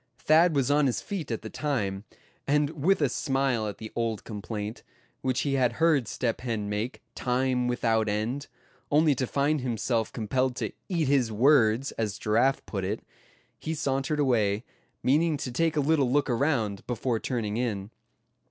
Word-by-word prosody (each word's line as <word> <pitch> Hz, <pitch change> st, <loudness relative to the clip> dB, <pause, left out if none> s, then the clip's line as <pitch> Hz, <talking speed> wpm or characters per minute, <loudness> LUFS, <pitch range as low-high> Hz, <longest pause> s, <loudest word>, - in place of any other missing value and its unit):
Thad 160 Hz, +1 st, +4 dB
was 140 Hz, -1 st, +2 dB
on 145 Hz, -1 st, +4 dB
his 125 Hz, -, 0 dB
feet 190 Hz, -8 st, -5 dB
at 115 Hz, -2 st, -3 dB
the 110 Hz, -, -6 dB
time; 105 Hz, -9 st, -2 dB, 0.4 s
and 150 Hz, +1 st, +2 dB
with 160 Hz, +3 st, +2 dB
a -, -, +4 dB
smile 135 Hz, -3 st, 0 dB
at 105 Hz, -, -5 dB
the 110 Hz, -, -8 dB
old 115 Hz, -3 st, -1 dB
complaint, 105 Hz, 0 st, -5 dB, 0.4 s
which 130 Hz, -1 st, 0 dB
he 140 Hz, -, 0 dB
had 125 Hz, -3 st, +2 dB
heard 155 Hz, -4 st, +2 dB
Step 115 Hz, 0 st, -2 dB
Hen 115 Hz, -4 st, -2 dB
make, 105 Hz, +5 st, -3 dB
time 125 Hz, 0 st, 0 dB
without 115 Hz, -3 st, +1 dB
end, 115 Hz, +7 st, -2 dB, 0.4 s
only 150 Hz, 0 st, +4 dB
to 130 Hz, -1 st, -2 dB
find 145 Hz, +2 st, +1 dB
himself 115 Hz, -2 st, -1 dB
compelled 125 Hz, +3 st, -1 dB
to -, -, -3 dB, 0.2 s
"eat 165 Hz, -6 st, 0 dB
his 130 Hz, -5 st, +2 dB
words," 125 Hz, +1 st, +4 dB
as 105 Hz, -2 st, -1 dB
Giraffe 120 Hz, +6 st, +1 dB
put 95 Hz, -3 st, -4 dB
it, 100 Hz, +4 st, -3 dB, 0.6 s
he 160 Hz, -, -3 dB
sauntered 135 Hz, +1 st, -1 dB
away, 110 Hz, -6 st, +2 dB, 0.4 s
meaning 155 Hz, +4 st, +3 dB
to 135 Hz, -3 st, -4 dB
take 160 Hz, +5 st, +1 dB
a -, -, +4 dB
little 140 Hz, -3 st, +2 dB
look 145 Hz, -1 st, +2 dB
around, 115 Hz, -6 st, 0 dB
before 120 Hz, -1 st, -1 dB
turning 110 Hz, -4 st, -2 dB
in. 105 Hz, -4 st, -2 dB
125 Hz, 170 wpm, -27 LUFS, 110-145 Hz, 0.6 s, Thad